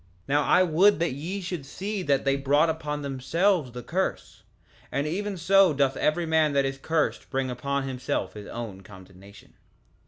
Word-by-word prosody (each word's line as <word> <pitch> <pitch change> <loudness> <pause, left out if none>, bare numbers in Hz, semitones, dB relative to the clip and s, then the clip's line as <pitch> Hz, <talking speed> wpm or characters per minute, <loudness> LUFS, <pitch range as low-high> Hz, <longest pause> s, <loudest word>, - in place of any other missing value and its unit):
3:19 - - -17
Now 145 +1 +3
I 185 - +5
would 185 +4 +4
that 165 -3 0
ye 175 +9 -5
should 175 -4 -5
see 195 +8 -4
that 140 -6 +1
they 135 0 +3
brought 145 +4 +3
upon 150 -2 -4
themselves 140 +3 0
the 125 0 -8
curse; 185 +8 -3 0.5
and 140 - -1
even 195 +5 -3
so 190 0 +4
doth 135 -1 +2
every 165 +3 0
man 160 -2 +2
that 140 -1 +2
is 135 0 -3
cursed 160 +1 -1
bring 135 -2 -1
upon 140 +3 -2
himself 125 -7 -3
his 105 -1 -9
own 110 -5 -7
condemnation. 95 +1 -15
145 Hz, 180 wpm, -26 LUFS, 130-170 Hz, 0.5 s, I